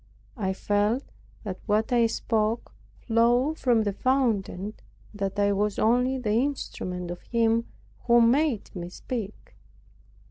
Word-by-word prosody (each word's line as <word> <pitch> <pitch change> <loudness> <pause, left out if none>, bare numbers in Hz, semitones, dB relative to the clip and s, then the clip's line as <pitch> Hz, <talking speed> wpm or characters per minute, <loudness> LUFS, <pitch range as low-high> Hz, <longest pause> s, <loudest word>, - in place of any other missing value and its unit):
I 190 -4 -1
felt 205 +6 0 0.4
that 190 -4 -5
what 215 +3 +1
I 235 -1 +4
spoke 225 0 -1 0.3
flowed 245 +6 +2
from 235 -4 +3
the 205 -1 -1
fountain, 240 -6 +1 0.2
and - - -25 0.3
that 195 -1 -3
I 205 0 +3
was 205 +1 0
only 250 +4 +2
the 235 -5 -2
instrument 185 -8 -2
of 175 - -7
Him 230 0 +1 0.4
who 235 0 +6
made 240 -1 +2
me 175 -1 -5
speak. 215 +1 -6
225 Hz, 135 wpm, -26 LUFS, 205-245 Hz, 0.4 s, who